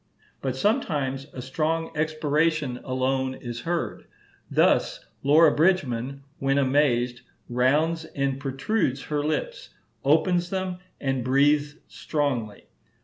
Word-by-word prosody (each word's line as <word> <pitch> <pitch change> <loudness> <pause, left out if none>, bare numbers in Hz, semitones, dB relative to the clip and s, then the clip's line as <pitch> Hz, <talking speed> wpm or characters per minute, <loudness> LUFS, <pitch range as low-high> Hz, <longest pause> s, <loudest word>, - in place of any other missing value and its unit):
But 130 -2 -2
sometimes 140 - 0
a 125 - -7
strong 160 +5 -1
expiration 155 -3 0
alone 130 0 -1
is 120 -2 -6
heard; 170 +6 -3 0.4
thus - - +2 0.2
Laura 150 +2 +6
Bridgman, 140 -6 +1 0.2
when 135 0 +1
amazed, 130 -3 +2 0.3
rounds 150 +7 +1
and 140 -3 -2
protrudes 135 - -1
her 150 -1 -2
lips, 485 - -3 0.3
opens 175 +5 +2
them, 185 -1 -3 0.2
and 135 -3 -1
breathes 145 +3 +3
strongly. 130 -9 -2
140 Hz, 105 wpm, -25 LUFS, 130-160 Hz, 0.4 s, Laura